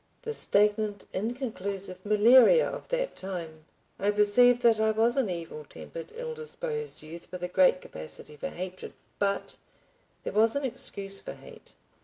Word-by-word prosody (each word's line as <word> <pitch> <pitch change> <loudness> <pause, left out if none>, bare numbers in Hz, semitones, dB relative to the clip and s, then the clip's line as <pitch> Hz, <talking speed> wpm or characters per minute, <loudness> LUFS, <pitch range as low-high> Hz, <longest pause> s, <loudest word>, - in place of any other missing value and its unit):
The 455 -1 -3
stagnant 210 - +1
inconclusive 200 -4 -3
malaria 240 - +6
of - - -6
that - - -2
time! 165 -5 -6 0.3
I 200 - +1
perceive 210 +4 +5
that 230 -2 +5
I 220 0 +3
was 225 +2 +2
an 265 -7 +1
evil 165 -3 -5
tempered, 165 +2 -9
ill 480 0 -5
disposed 460 - -5
youth 165 +2 -10
with 180 -1 -6
a - - 0
great 185 0 +4
capacity 80 - -8
for 145 - -5
hatred, 185 +1 -7 0.3
but— 200 -1 -1 0.7
There - - -4
was 225 +3 +4
an 280 -1 -1
excuse 195 -5 -2
for - - -7
hate. 485 -2 -15
210 Hz, 155 wpm, -28 LUFS, 185-245 Hz, 0.7 s, malaria